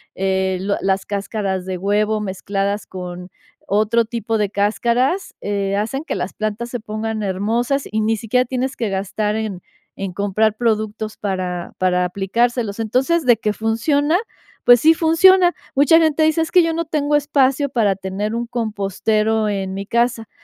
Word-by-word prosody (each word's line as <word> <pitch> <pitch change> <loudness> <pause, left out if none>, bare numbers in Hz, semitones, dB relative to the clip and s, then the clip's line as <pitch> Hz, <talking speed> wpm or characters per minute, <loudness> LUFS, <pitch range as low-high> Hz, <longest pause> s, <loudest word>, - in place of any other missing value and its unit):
eh, 190 0 0
lo 200 +1 0
las 195 0 0
cáscaras 200 -2 -3
de 185 -1 -3
huevo 210 +3 +1
mezcladas 200 +1 -2
con 180 -1 -7 0.4
otro 215 +3 +2
tipo 225 -1 -2
de 205 -2 +1
cáscaras, 235 - 0
eh, 200 -1 -1
hacen 230 +8 -2
que - - -4
las 180 - -4
plantas 215 +2 -3
se 245 - -4
pongan 215 0 -4
hermosas, 230 +8 -1
y 220 +1 0
ni 220 +1 +1
siquiera 250 +4 +1
tienes 260 +2 -2
que 225 - -2
gastar 205 +2 -2
en 210 -5 -4 0.4
en 195 -2 -4
comprar 205 +2 +1
productos 215 -1 -2
para 185 -3 -3
para 180 -1 +1
aplicárselos. 210 +4 -1
Entonces, 265 +9 +1
de 240 -2 +6
que 215 -1 -1
funciona, 285 +9 +1 0.5
pues 245 0 +7
sí 320 +6 +6
funciona. 350 +3 +5 0.2
Mucha 290 +4 +6
gente 315 -1 +2
dice: 315 +1 +2
"Es 325 - -1
que 360 - +6
yo 330 0 0
no 335 0 -2
tengo 295 -1 0
espacio 285 -1 +2
para 220 -6 +1
tener 195 +3 -3
un 235 +1 -3
compostero 215 -1 0
en 190 -2 -3
mi 195 +1 -5
casa". 235 -1 0
215 Hz, 165 wpm, -20 LUFS, 200-250 Hz, 0.5 s, pues